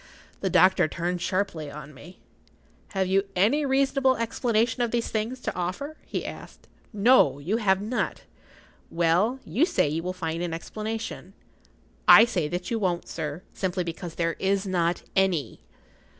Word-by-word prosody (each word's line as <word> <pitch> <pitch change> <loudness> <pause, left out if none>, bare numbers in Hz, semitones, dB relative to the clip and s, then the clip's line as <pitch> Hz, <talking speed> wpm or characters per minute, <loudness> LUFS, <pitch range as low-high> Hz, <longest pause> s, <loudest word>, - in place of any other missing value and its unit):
The 190 - -1
doctor 185 -2 +5
turned 175 +3 -3
sharply 185 -6 -2
on 150 +1 -10
me—— 175 +7 -13 0.8
"Have 190 0 +2
you 195 +2 +2
any 240 +11 +2
reasonable 270 -1 +2
explanation 230 0 0
of 240 - +1
these 235 0 -1
things 225 +4 -2
to - - -3
offer?" 185 - -4
he - - -3
asked. - - -10 0.2
"No; 210 - +4
you 175 +10 -1
have 190 -4 +2
not. 235 +4 -2 0.7
Well, 175 +10 +2
you 205 - +1
say 335 - +2
you 155 +3 -2
will 180 +2 -3
find 165 -2 -4
an 170 -2 -2
explanation. 215 +6 -6 0.7
I 225 - +10
say 180 -10 -1
that 175 +5 -4
you 230 - 0
won't, 180 -4 -1
sir, 150 +4 -5
simply 185 -1 -2
because 170 0 -6
there 165 -1 0
is 195 +1 +1
not 175 -2 0
any." 190 -6 +1
190 Hz, 155 wpm, -26 LUFS, 170-225 Hz, 0.8 s, I